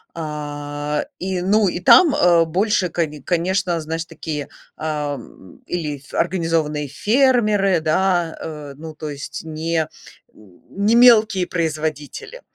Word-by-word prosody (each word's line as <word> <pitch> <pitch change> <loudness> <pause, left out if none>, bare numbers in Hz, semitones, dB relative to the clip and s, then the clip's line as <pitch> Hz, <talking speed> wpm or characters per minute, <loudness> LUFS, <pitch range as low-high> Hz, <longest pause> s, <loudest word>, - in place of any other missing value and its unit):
А, 150 -1 -4
и, 185 -1 -2
ну, 205 +3 +3
и 175 - -2
там, 290 - +6
а, 170 -2 +4
больше, 185 +2 +1
коне 155 -4 -3
конечно, 180 +2 0
знаешь, 160 +1 -4
такие, 150 -3 -6 0.3
ам, 145 - -5
или 155 -5 -3
ф 135 0 -18
организованные 165 -4 0
фермеры, 210 - +2
да, 175 +1 +1
э, 150 -3 -7
ну, 160 0 -9
то 155 0 -6
есть 145 -1 -7
не 160 +1 -2 0.5
н 100 -4 -19
не 205 +4 +1
мелкие 220 -6 +6
производители. 160 - -4
165 Hz, 125 wpm, -20 LUFS, 150-190 Hz, 0.5 s, там